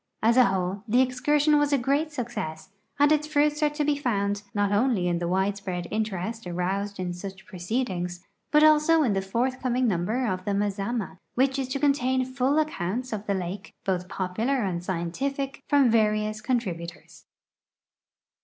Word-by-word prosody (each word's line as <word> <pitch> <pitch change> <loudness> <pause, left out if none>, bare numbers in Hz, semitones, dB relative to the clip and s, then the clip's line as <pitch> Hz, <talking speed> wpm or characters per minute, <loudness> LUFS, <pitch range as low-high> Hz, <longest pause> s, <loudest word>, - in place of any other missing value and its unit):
As 230 +1 +4
a 255 -1 +7
whole 190 0 -1
the 235 +4 +3
excursion 295 +4 +3
was 290 0 +1
a 280 - +4
great 280 +5 0
success, 235 - -5 0.3
and 290 +1 +4
its 300 0 +2
fruits 300 0 +2
are 300 - +4
to 295 0 -2
l)e 295 - +3
found, 205 -7 -1
not 205 -1 0
only 205 -3 +2
in 170 -1 0
the 170 - -2
widespread 190 -1 -1
interest 215 0 -3
aroused 190 +3 -2
in 180 -1 -2
such 190 +2 -8
proccecl 215 +8 -2
ings, 180 0 -5 0.2
but 300 0 +5
also 310 +1 +5
in 235 -7 +2
the 195 - 0
forthcoming 250 +4 0
number 215 +6 0
of 185 -4 -2
the 200 +1 -1
Mazama, 200 0 -2 0.2
which 265 +2 +2
is 265 - -1
to 270 +2 -3
contain 260 -2 +2
full 260 +2 0
accounts 250 - -1
of 215 0 -5
the 200 - +1
lake, 190 +2 -5
both 180 -1 -1
popular 220 +9 -1
and 175 -3 -2
scientific, 265 +12 -3
from 280 -5 +5
various 215 -1 +1
contributors. 190 -9 -2
J. - - -23
S. - - -18
220 Hz, 175 wpm, -26 LUFS, 190-265 Hz, 0.3 s, a